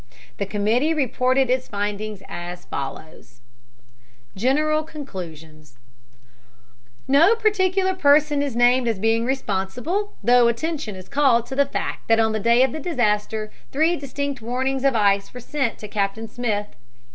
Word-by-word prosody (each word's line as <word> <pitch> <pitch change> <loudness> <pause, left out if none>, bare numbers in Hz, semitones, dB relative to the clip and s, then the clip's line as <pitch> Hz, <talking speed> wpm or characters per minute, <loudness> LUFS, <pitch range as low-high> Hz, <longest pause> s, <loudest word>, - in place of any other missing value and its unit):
The 200 - -3
committee 225 +10 +1
reported 255 -2 +1
its 255 0 0
findings 205 0 -4
as 175 +1 -7
follows: 135 -4 -8 0.9
GENERAL 300 +8 +1
CONCLUSIONS 160 - -10 1.3
No 320 +11 +5
particular 385 -4 +1
person 295 -3 +3
is 280 -4 -2
named 245 +1 +4
as 225 -3 0
being 225 +3 +1
responsible, 265 - -2
though 240 +2 +5
attention 235 - -2
is 185 -1 -11
called 270 -5 +3
to 265 - -7
the 280 0 +3
fact - - -4
that 225 0 +4
on 220 0 +3
the 220 - -1
day 235 +4 +4
of 265 - +1
the 315 - -5
disaster 215 -8 -1 0.2
three 320 +5 +2
distinct 280 -2 -4
warnings 260 +3 -2
of 275 -3 +3
ice 200 -2 +2
were - - -6
sent 265 -1 -2
to 210 - -8
Captain 205 +2 -2
Smith. 215 - -3
245 Hz, 145 wpm, -22 LUFS, 210-285 Hz, 1.3 s, No